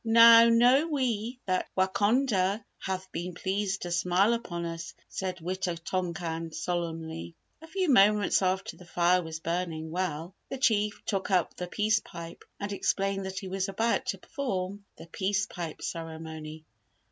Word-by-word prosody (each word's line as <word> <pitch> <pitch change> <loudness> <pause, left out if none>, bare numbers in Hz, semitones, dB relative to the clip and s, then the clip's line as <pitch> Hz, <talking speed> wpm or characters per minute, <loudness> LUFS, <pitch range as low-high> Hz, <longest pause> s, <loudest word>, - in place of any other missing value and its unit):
"Now 230 0 +8
know 245 +6 +5
we 250 -5 -1
that 185 -1 0
Wakonda 205 +1 +2
hath 190 0 -4
been 175 +1 -4
pleased 195 +1 -1
to 175 - -4
smile 180 +6 +3
upon 175 -7 -3
us," 165 0 -6
said 185 -1 -3
Wita 180 0 -2
tonkan, 170 -1 -3
solemnly. 165 -1 -3 0.3
A 320 - -11
few 375 +2 -1
moments 210 - +5
after 190 0 0
the 180 - -13
fire 175 +1 +3
was 160 -1 -6
burning 165 -2 -2
well, 175 -1 -2 0.2
the 270 - -4
Chief 210 -4 +1
took 195 -2 -1
up 185 -4 +2
the 180 - -5
peace 215 +3 +2
pipe 170 -4 -10 0.2
and 205 0 -3
explained 195 -1 0
that 190 0 -6
he 195 0 -4
was 190 +1 -2
about 225 +4 0
to - - -1
perform 200 - -4
the - - -10
peace 195 +3 0
pipe 170 -5 -6
ceremony. 160 -1 -6
190 Hz, 155 wpm, -29 LUFS, 170-210 Hz, 0.3 s, Now